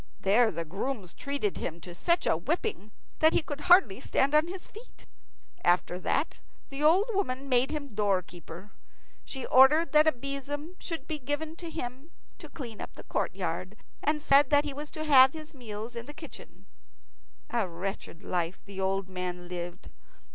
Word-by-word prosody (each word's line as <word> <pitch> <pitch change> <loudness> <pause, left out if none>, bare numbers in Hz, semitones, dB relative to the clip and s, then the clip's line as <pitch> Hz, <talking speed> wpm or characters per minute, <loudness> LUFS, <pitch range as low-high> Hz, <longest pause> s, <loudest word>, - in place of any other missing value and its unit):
There 220 +4 +4
the 170 -4 -4
grooms 195 +2 -4
treated 280 -8 -2
him 170 0 -4
to 175 - -9
such 340 - +1
a - - +3
whipping 300 - -2 0.3
that 315 +1 +5
he - - +3
could 290 -1 -6
hardly 320 - +5
stand 270 +2 +1
on 305 +2 +5
his 365 +1 -7
feet. 450 +4 -14 0.6
After 175 0 +2
that 285 - 0 0.3
the 275 0 -5
old 370 +10 +4
woman 275 -9 -1
made 255 0 +4
him 285 -5 -5
doorkeeper. 185 -2 -2 0.5
She 265 -2 -5
ordered 295 +6 +6
that 305 +1 +6
a - - +7
besom 280 +5 -4
should 330 -2 -5
be 310 -1 -3
given 290 +4 -3
him 315 -4 -6 0.3
to - - -10
clean 235 -7 -8
up - - -7
the - - -11
courtyard, - - -3 0.2
and 300 0 0
said 280 -1 +5
that 290 0 +4
he 290 - -3
was 295 +2 -6
to 310 - -5
have 265 -3 +7
his 310 -1 -9
meals 230 -2 -7
in 235 +1 -6
the 295 - -9
kitchen. 315 0 -12 0.9
A 230 -6 0
wretched 180 +1 -6
life 175 0 -2
the 195 -1 -6
old 195 0 0
man 180 -1 -5
lived. 175 +1 -6
265 Hz, 170 wpm, -29 LUFS, 195-305 Hz, 0.9 s, a